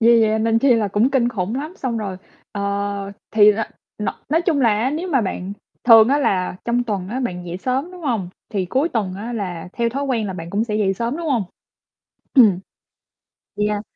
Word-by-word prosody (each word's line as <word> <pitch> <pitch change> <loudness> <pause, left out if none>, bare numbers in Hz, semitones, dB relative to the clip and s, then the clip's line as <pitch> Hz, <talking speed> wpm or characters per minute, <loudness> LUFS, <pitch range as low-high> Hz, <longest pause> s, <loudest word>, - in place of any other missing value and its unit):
Vì 230 0 +6
vậy 220 0 +2
nên 225 +1 +2
chi 255 +1 +4
là 220 -3 +1
cũng 210 +6 +2
kinh 255 -3 +2
khủng 205 -2 -3
lắm, 300 +6 -4
xong 235 -4 -2
rồi, 195 -3 -4 0.4
ờ, 205 - -4 0.7
thì 210 -1 +6
r - - -6 0.5
n - - -1 0.2
nói 320 +4 +2
chung 330 -5 +1
là 240 - +4
á, 255 +4 +1
nếu 325 +6 -3
mà 275 -7 +2
bạn 190 -2 -3 0.3
thường 225 -2 +8
á, 280 +2 +3
là 185 -10 0
trong 240 +1 +1
tuần 200 -5 -3
á, 250 +5 -3
bạn 180 -8 -4
dậy 175 +1 -4
sớm, 260 - -1
đúng 360 -1 -11
hông? 230 - -1 0.2
Thì 195 -5 -1
cuối 265 - +1
tuần 205 - -2
á, 220 +5 -6
là 180 -7 -4
theo 235 -1 0
thói 275 +4 -3
quen 240 -6 0
là 190 - -3
bạn 170 -2 -7
cũng 210 +4 0
sẽ 210 -2 -2
dậy 195 -2 +1
sớm, 235 +7 -2
đúng 335 0 -5
hông? 240 -8 +1 0.9
Ừm. 220 -9 +6 1.0
Yeah. 210 0 0
225 Hz, 220 wpm, -21 LUFS, 200-260 Hz, 1.0 s, thường